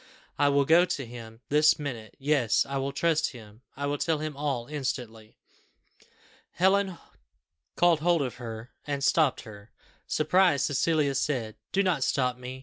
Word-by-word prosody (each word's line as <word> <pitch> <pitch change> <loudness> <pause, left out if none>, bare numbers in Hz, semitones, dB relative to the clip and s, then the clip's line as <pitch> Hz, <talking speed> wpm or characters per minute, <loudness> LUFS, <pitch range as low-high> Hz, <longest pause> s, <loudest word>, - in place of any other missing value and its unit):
I 145 - +4
will 140 0 +3
go 165 +4 +6
to 145 -7 -3
him 115 -1 -11
this 150 +1 +4
minute; 120 -7 -6
yes, 140 -5 +2
I 140 - -3
will 135 +1 -2
trust 155 +1 0
him 110 -2 -14 0.2
I 140 - -3
will 145 0 -2
tell 165 -2 +1
him 155 -1 -5
all 140 -4 -2
instantly." 125 -6 -5 1.2
Helen 190 0 +2 0.8
caught 175 -2 +4
hold 170 -1 +2
of 125 -3 -5
her, 115 -1 -8 0.2
and 140 -1 -2
stopped 145 -3 +2
her. 105 -2 -13 0.4
Surprised, 155 -2 +3
Cecilia 145 0 +1
said, 125 -5 -2 0.2
"Do 195 - +2
not 175 -8 +1
stop 125 -2 0
me. 125 +1 -7
140 Hz, 155 wpm, -27 LUFS, 125-155 Hz, 1.2 s, go